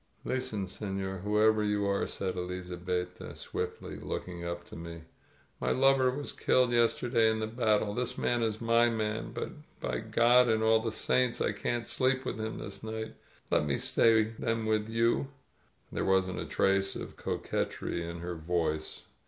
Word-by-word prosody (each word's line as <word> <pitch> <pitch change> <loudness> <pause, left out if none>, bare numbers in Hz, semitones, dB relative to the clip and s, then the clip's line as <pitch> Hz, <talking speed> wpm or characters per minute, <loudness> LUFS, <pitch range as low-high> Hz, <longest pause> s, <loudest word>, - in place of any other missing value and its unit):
"Listen, 110 -6 -1
seiior, 95 -1 -4
whoever 105 +1 +3
you 105 -1 +1
are!" 100 0 +1
said 95 -1 -2
Elizabetta 90 0 -4
swiftly, - - -4
looking 90 -1 -5
up 85 0 -4
to - - -11
me. 85 0 -8 0.6
"My - - -1
lover 135 -1 +4
was 140 +3 -4
killed 125 -1 +3
yes 120 -1 +3
terday 115 -2 +3
in 110 0 0
the 110 - -1
battle. 110 -2 +1
This 125 +2 -2
man 120 -1 +1
is 110 -1 0
my 115 +1 +4
man, 110 -1 -2
but, - - -4 0.3
by - - -2
God 120 +1 +4
and 110 0 +2
all 110 0 +5
the 115 0 -2
Saints, 125 +2 +1
I - - +1
can't 120 -1 -2
sleep 130 +2 +1
with - - -3
him 110 0 -3
this 100 -1 -7
night. 110 0 -5 0.4
Let - - +4
me 70 - +1
stay 115 -1 +4 0.2
then 115 -1 -1
with 110 0 +1
you!" 115 +4 +2 0.6
There - - -2
wasn't 95 -1 +2
a - - -3
trace 95 0 +2
of - - -7
coquetry 85 - -2
in 85 0 -6
her 90 0 -4
voice. 80 -2 -2
110 Hz, 170 wpm, -30 LUFS, 95-115 Hz, 0.6 s, all